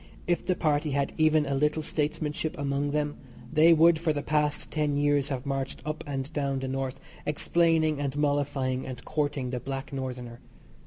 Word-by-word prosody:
If 175 -1 +1
the 185 - +1
Party 150 -2 +1
had 140 0 0
even 155 -1 +4
a 140 - -1
little 150 +3 +1
statesmanship 155 +2 -2
among 140 0 -1
them 150 0 -1 0.4
they 160 +2 +7
would 165 0 +6
for 165 -1 +1
the 145 -1 -3
past 150 -1 0
ten 150 -2 0
years 145 -1 +2
have 135 -1 -3
marched 135 -1 -2
up 155 0 -3
and 135 +1 -4
down 140 -2 0
the 130 0 -3
North 135 0 -3 0.2
explaining 160 0 +2
and 140 0 -2
mollifying 140 -3 0
and 125 -1 -7
courting 145 -4 -1
the 125 - -2
Black 135 +2 -5
Northerner. 125 -3 -5
145 Hz, 175 wpm, -28 LUFS, 135-155 Hz, 0.4 s, they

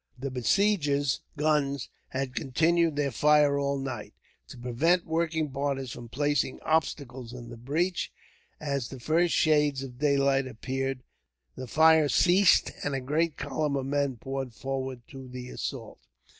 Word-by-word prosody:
The 135 +2 -4
besiegers' 145 - +1 0.2
guns 145 -3 +1 0.2
had 130 -1 -3
continued 160 +4 +2
their 145 -2 0
fire 145 +2 +4
all 140 0 0
night, 130 -5 -6 0.3
to - - -11
prevent 145 +9 +1
working 160 -2 -1
parties 135 -2 -2
from 120 -1 -9
placing 145 +1 0
obstacles 135 -6 -1
in 120 -2 -9
the 120 - -8
breach. 155 +10 -1 0.5
As 140 -5 -2
the 130 - -9
first 165 +6 +2
shades 150 -3 +3
of 125 -2 -9
daylight 140 -2 +2
appeared 130 +2 -3 0.5
the 130 - -7
fire 160 +2 +5
ceased, 185 +4 +4
and 145 -1 -1
a - - -1
great 150 +5 0
column 145 +1 -1
of 135 -1 -2
men 140 -2 0
poured 135 -1 -5
forward 130 -2 -4
to 135 -2 -10
the 125 0 -8
assault. - - -6
140 Hz, 145 wpm, -28 LUFS, 130-155 Hz, 0.5 s, fire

